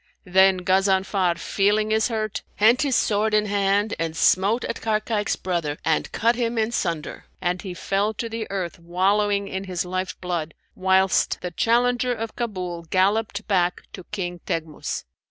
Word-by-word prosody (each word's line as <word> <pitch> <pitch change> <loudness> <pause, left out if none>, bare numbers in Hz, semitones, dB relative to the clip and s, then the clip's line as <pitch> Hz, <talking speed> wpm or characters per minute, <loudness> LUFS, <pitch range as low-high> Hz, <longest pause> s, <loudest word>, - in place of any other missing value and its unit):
Then 190 0 +4
Ghazanfar, 190 -1 +2
feeling 210 +4 +1
his 220 0 +3
hurt, 215 -3 -3
hent 230 +6 +4
his 280 -4 +1
sword 215 +1 +2
in 210 0 +3
hand 200 +1 +1
and 165 -1 -2
smote 200 +9 +3
at 230 - -4
Barkayk's 215 -1 0
brother 170 -5 -2
and 160 -1 +1
cut 230 +2 +2
him 235 -1 -1
in 220 +1 +1
sunder, 170 -8 -3
and 180 0 -1
he 185 -3 -6
fell 200 +4 0
to 230 - -3
the 225 -1 -5
earth, 185 -3 -4
wallowing 200 +4 +1
in 190 0 -4
his 180 -2 -2
life 185 +1 -3
blood, 170 -4 -3 0.2
whilst 190 0 +2
the 180 - -4
challenger 245 +6 +2
of 225 -1 -5
Kabul 185 -7 -4
galloped 205 +4 +1
back 180 -3 +1
to 185 - -8
King 180 -4 -4
Teghmus. 160 -2 -3
195 Hz, 160 wpm, -24 LUFS, 180-215 Hz, 0.2 s, Then